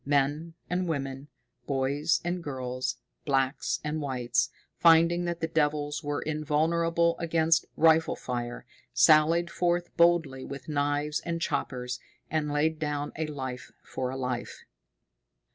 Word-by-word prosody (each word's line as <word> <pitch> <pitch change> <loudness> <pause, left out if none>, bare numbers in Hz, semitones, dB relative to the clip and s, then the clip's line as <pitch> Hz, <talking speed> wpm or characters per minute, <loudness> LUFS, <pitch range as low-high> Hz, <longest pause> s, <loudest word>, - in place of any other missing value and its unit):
Men 145 +4 0
and 180 0 -1
women, 135 -3 -3 0.4
boys 140 +3 +1
and 175 0 -2
girls, 130 -3 -3 0.3
blacks 135 -1 0
and 155 +1 -2
whites, 125 -4 0 0.3
finding 170 +1 +5
that 170 0 -3
the 165 - 0
devils 150 -2 0
were 145 0 -2
invulnerable 165 +3 +1
against 165 -1 +2
rifle 160 0 +4
fire, 120 -1 -5 0.3
sallied 165 +2 +5
forth 175 0 0
boldly 165 -6 +3
with 140 -1 -8
knives 145 0 0
and 170 -1 -3
choppers, 125 -6 -2 0.3
and 150 -1 0
laid 155 +2 +1
down 145 -1 -2
a 160 0 -2
life 130 -4 -6
for 130 -1 -4
a 130 - -4
life. 125 -2 -4
150 Hz, 125 wpm, -28 LUFS, 135-165 Hz, 0.4 s, finding